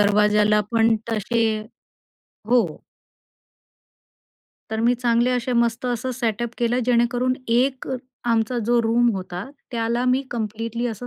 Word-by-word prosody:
दरवाज्याला 210 +1 +4
पण 225 -1 +4
तसे 225 +2 0 1.1
हो. 245 0 +5 2.1
तर 220 - -2
मी 240 +2 +3
चांगले 240 0 +2
असे, 250 0 -1
मस्त 235 0 +1
असं 245 +1 -2
सेटअप 235 -1 -2
केलं, 240 +1 +1
जेणेकरून 245 +1 +2
एक 255 +3 +1 0.4
आमचा 230 +1 +1
जो 240 0 +3
रूम 235 +2 +3
होता, 185 -1 -5 0.3
त्याला 235 +1 -1
मी 255 +2 +2
कम्प्लीटली 230 +1 -3
असं 240 +1 -5
235 Hz, 120 wpm, -22 LUFS, 225-245 Hz, 2.1 s, हो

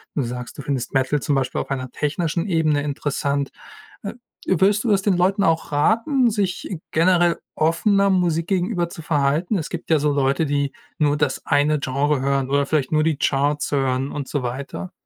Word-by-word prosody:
Du 145 - 0
sagst, 125 0 -6
du - - -5
findest 135 -4 -3
Metal 135 +2 +1
zum 145 - 0
Beispiel 135 -1 -1
auf - - -8
einer 130 -2 -3
technischen 165 +5 -2
Ebene 160 -5 +1
interessant. 140 -1 -2 0.5
Äh, 200 - -4 0.3
würdest 195 +3 +3
du 240 - -1
das 195 -1 +3
den 190 -2 +1
Leuten 190 +3 +2
auch 165 -3 +1
raten, 230 - +2
sich 200 -5 -2 0.2
generell 175 +1 +3 0.2
offener 195 +5 +2
Musik 170 -3 +1
gegenüber 180 -2 0
zu 170 - -9
verhalten? 150 +6 +1
Es 160 - -4
gibt 175 - -7
ja 160 - +5
so 150 +1 +1
Leute, 140 +2 +1
die 140 -1 0 0.3
nur 145 -1 +2
das 145 -2 -1
eine 145 +1 +2
Genre 140 +1 0
hören 135 -1 0
oder 140 0 +2
vielleicht 145 -4 0
nur 155 -1 +3
die 160 -2 +1
Charts 145 +1 0
hören 135 -1 0
und 140 -2 -5
so 145 -3 -2
weiter. 135 +8 -5
150 Hz, 185 wpm, -22 LUFS, 140-175 Hz, 0.5 s, ja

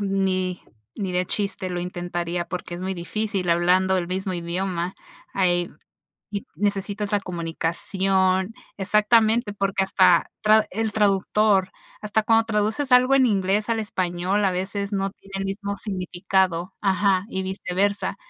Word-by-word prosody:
ni 190 -2 0 0.4
ni 195 -3 -3
de 180 0 0
chiste 200 -2 -2
lo 175 -1 -2
intentaría 175 -1 -3
porque 180 -1 -5
es 175 - -7
muy 190 +1 -2
difícil 190 +1 -2
hablando 180 +2 +3
el 175 -2 -1
mismo 190 +2 -3
idioma. 175 +1 -3 0.4
Hay 175 -2 +1 0.6
y 200 - -4
necesitas 205 +1 -2
la 205 - +2
comunicación. 185 +3 0 0.2
Exactamente, 215 +2 +3
porque 195 -1 0
hasta 185 -2 +4
tra 215 0 +5
el 220 +2 -1
traductor 200 -1 +2 0.3
hasta 210 +1 0
cuando 225 +1 +3
traduces 220 +5 0
algo 255 +2 +6
en 265 -1 +5
inglés 200 0 +1
al 230 -1 +1
español 185 -1 -1
a - - +3
veces 200 +2 -3
no 195 0 -1
tiene 195 0 -19
el 195 - -2
mismo 200 +1 -4
significado. 185 -2 -1
Ajá 195 -1 +2
y 190 - -3
viceversa. 190 +1 -1
195 Hz, 140 wpm, -23 LUFS, 180-205 Hz, 0.6 s, algo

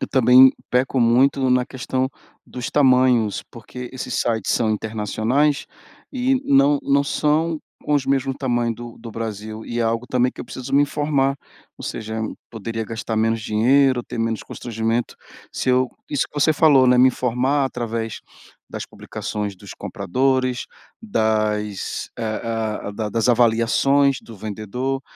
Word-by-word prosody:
eu - - -2
também 130 0 +7 0.2
peco 130 +1 +1
muito 130 +3 +3
na 125 0 +3
questão 130 0 -2 0.4
dos 125 -1 -5
tamanhos, 125 -6 +3
porque 125 +2 -9
esses 130 - -5
sites 115 -2 0
são 110 -2 +1
internacionais 110 +7 0 0.5
e 260 0 +1
não 140 +1 +4
não 140 0 +3
são 155 +3 +1 0.2
com 150 - 0
os 140 -2 +1
mesmo 135 0 +1
tamanho 120 -3 0
do 120 0 -9
do 115 - -9
Brasil, 110 0 -6
e 120 - -4
é - - +2
algo 115 +2 -1
também 125 0 +1
que - - -11
eu - - -5
preciso 130 - -8
me 145 - +6
informar. 145 -2 0 0.4
Ou - - -10
seja, 110 0 -4 0.3
poderia 115 0 -4
gastar 115 0 -4
menos 115 +1 +1
dinheiro, 125 +4 +3
ter 120 0 -8
menos 115 -1 -1
constrangimento 115 0 -3 0.4
se - - -3
eu 130 0 +3 0.2
isso 145 -3 0
que - - -32
você 155 +2 +4
falou, 145 -4 +5
né, 125 0 +5
me 130 +1 +7
informar 130 +3 0
através 115 -3 -4 0.5
das - - -6
publicações 105 -1 -5
dos 90 - -11
compradores, 130 +3 -1 0.4
das, 110 - -1
ah 110 -1 -3
ah, - - -3
da 105 +1 -3
das 115 +3 0
avaliações 125 +4 +3
do 115 - -12
vendedor, 110 +6 -4
125 Hz, 155 wpm, -21 LUFS, 110-135 Hz, 0.5 s, também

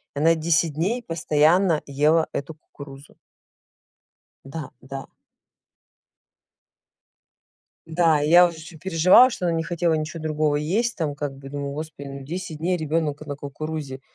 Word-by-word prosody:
и 140 - -3
она 165 +2 +4
10 160 -1 +1
дней 210 - -1
постоянно 165 +1 +2
ела 150 +4 +2
эту 140 +3 -5
кукурузу. 140 -1 -13 1.3
Да, 145 0 -7
да. 135 +1 -7 2.8
Да, 160 -2 +2
и 150 - 0
я 175 +2 +8
уж 170 - -5
очень 160 0 -12
переживала, 185 +8 +6
что 180 -6 -3
она 170 - +1
не 165 - 0
хотела 170 -1 0
ничё 155 +2 -3
другого 155 -1 0
есть 205 +11 0
там, 155 -5 -2
как 140 -1 -5
бы, 135 0 -11
думаю, 140 0 -4
Господи, 150 -2 -7
ну 135 0 -8
10 165 +1 -6
дней 180 +3 0
ребенок 155 -2 -2
на 145 -1 -5
кукурузе. 145 -1 -6
155 Hz, 145 wpm, -23 LUFS, 145-170 Hz, 2.8 s, я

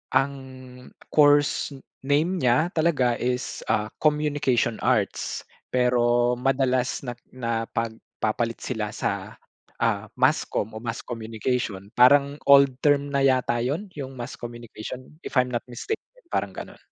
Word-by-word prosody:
ang 135 +1 +3 0.8
course 145 -1 +4 0.3
name 150 +7 +2
niya, 130 +2 +3
talaga 145 -7 +2
is 125 +1 -2
ah, 105 0 +1 0.2
communication 145 -6 +2
arts. - - 0 0.3
Pero 120 -1 +3
madalas 130 -1 +1
na 125 -2 -5 0.2
napagpapalit 115 -1 -3
sila 105 -4 -3
sa - - -4 0.4
ah, - - 0
mass - - +4
comm 110 +1 -3
o - - -5
mass 115 0 -3
communication, 110 -3 -3
parang 140 +3 +6
old 140 -2 +7
term 145 -1 +3
na 140 -1 +1
yata 130 -3 +2
yun? 150 +12 -2
Yung 135 -2 -6
mass 120 - -5
communication, 120 +3 -8
if - - -7
I'm 125 0 +1
not 120 - -2
mistaken, 265 - -4 0.3
parang - - -1
ganon. - - -8
125 Hz, 130 wpm, -25 LUFS, 120-140 Hz, 0.8 s, old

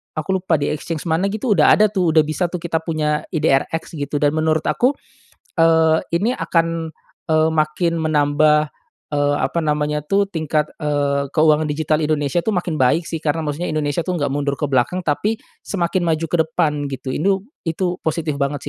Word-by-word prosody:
aku 180 +5 -1
lupa 175 -2 +1
di 145 -1 -1
exchange 155 +1 -4
mana 165 +3 0
gitu 215 +4 -2
udah 160 -7 +6
ada 215 -1 +3
tuh 180 -6 +1
udah 155 - +6
bisa 155 +4 -1
tuh 175 -1 -6
kita 165 -1 0
punya 155 -2 -2
IDRX 160 -1 0
gitu 145 +1 -4
dan 145 - +4
menurut 155 0 +1
aku, 260 +4 +1 0.6
eee, 160 -1 +4 0.2
ini 200 +8 +2
akan, 165 -1 -1 0.3
eee, 155 0 +3
makin 160 +2 0
menambah, 150 -1 +2 0.4
eee, 145 -1 +1
apa 170 - -1
namanya 150 -1 0
tuh 200 +3 +1
tingkat, 155 -3 -1
eee, 145 -1 0
keuangan 155 -1 +4
digital 155 +1 0
Indonesia 150 -1 0
tuh 205 +5 0
makin 175 -3 -2
baik 130 +6 +3
sih 165 0 -5
karena 160 +1 -1
maksudnya 155 +3 -3
Indonesia 155 +1 -1
tuh 185 - -1
enggak 145 -5 -1
mundur 140 0 -1
ke 140 +1 -3
belakang 135 +8 +1
tapi 205 +8 -1 0.2
semakin 180 -1 -1
maju 165 0 0
ke - - +2
depan 150 -2 0
gitu 135 -1 -5
itu 190 +8 +1 0.2
itu 175 +2 -1
positif 155 -2 -1
banget 140 0 -1
155 Hz, 180 wpm, -20 LUFS, 150-170 Hz, 0.6 s, udah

